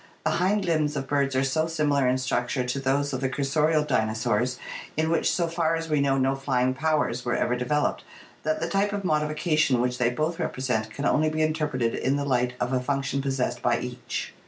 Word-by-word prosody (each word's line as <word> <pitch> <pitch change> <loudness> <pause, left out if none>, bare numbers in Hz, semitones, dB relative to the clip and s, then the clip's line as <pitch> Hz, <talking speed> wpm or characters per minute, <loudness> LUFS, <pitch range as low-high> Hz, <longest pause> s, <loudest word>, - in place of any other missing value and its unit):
The - - +2
hind 190 +3 +1
limbs 155 -3 +1
of 135 -1 -3
birds 140 -1 +1
are 130 - +2
so 155 +4 +1
similar 145 -4 +1
in 125 +1 +2
structure 125 0 -1
to 125 +2 -2
those 140 +1 0
of 130 - -2
the 130 - 0
cursorial 150 +3 +1
dinosaurs, 110 +1 0 0.4
in 160 +1 +1
which 165 - +2
so 170 -2 0
far 165 -1 0
as 165 0 -4
we 150 -2 +3
know 135 -1 +2
no 135 0 +2
flying 130 -2 0
powers 145 -4 0
were 120 - 0
ever 125 - +1
developed, 125 +4 0 0.4
that 155 0 -1
the 165 - -1
type 200 +4 +1
of 200 -1 -3
modification 155 -3 +1
which 125 +1 0
they 120 -1 +3
both 155 +7 -2
represent 125 -4 -1
can 140 +6 -5
only 155 +1 +3
be 155 0 0
interpreted 150 -7 0
in 135 +2 0
the 145 0 -1
light 125 -2 +1
of 125 +1 -1
a 130 - +2
function 140 +1 -1
possessed 135 -2 -1
by - - +2
each. - - -5
140 Hz, 210 wpm, -26 LUFS, 125-155 Hz, 0.4 s, we